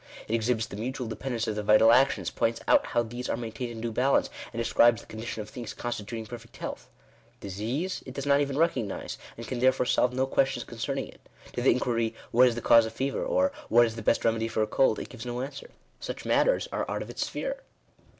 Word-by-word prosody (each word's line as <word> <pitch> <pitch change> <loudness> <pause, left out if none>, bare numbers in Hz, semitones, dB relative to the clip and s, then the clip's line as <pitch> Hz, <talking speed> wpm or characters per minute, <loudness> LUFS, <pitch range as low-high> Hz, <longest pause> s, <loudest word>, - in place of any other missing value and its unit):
It 110 - -3
exhibits 115 0 +1
the 100 - -9
mutual 125 +3 -3
dependence 115 +1 -3
of 110 - -1
the 105 - -2
vital 105 +2 +6
actions; 135 +3 +3
points 115 0 0
out - - +4
how 120 0 +1
these 120 +2 -6
are - - 0
maintained 115 +1 -5
in 115 -1 -7
due 115 0 -2
balance, 130 +5 +2 0.2
and 115 - -5
describes 115 0 +4
the - - -16
condition 110 0 -5
of 105 - -13
things 120 -4 -7
constituting 115 -1 -4
perfect 115 +1 -10
health. - - -6 0.5
Disease 115 - -3
it 130 - -8
does 140 - -4
not 140 0 +4
even 140 -1 -1
recognise, 130 - -1 0.2
and 115 -1 -7
can 125 +2 -3
therefore 130 0 +3
solve 125 0 +2
no 130 +1 +1
questions 135 0 +1
concerning - - -4
it. - - -16 0.3
To 120 - -2
the 130 - +4
inquiry 115 -2 +1
— - - -23
What 125 +2 +6
is 120 - 0
the 120 - -4
cause 115 -1 +6
of 110 - -8
fever? 135 +4 -2
or, 280 0 +2 0.2
what 120 - +6
is 115 -1 -4
the 115 - -6
best 115 - +1
remedy 115 0 +2
for 110 -1 0
a - - +2
cold? 130 -3 +3
it - - -5
gives 125 -2 -9
no 120 0 -4
answer. 140 +1 -7 0.3
Such - - -6
matters - - +2
are - - -2
out - - -2
of - - -9
its - - -2
sphere. - - -3
120 Hz, 235 wpm, -28 LUFS, 115-130 Hz, 0.5 s, vital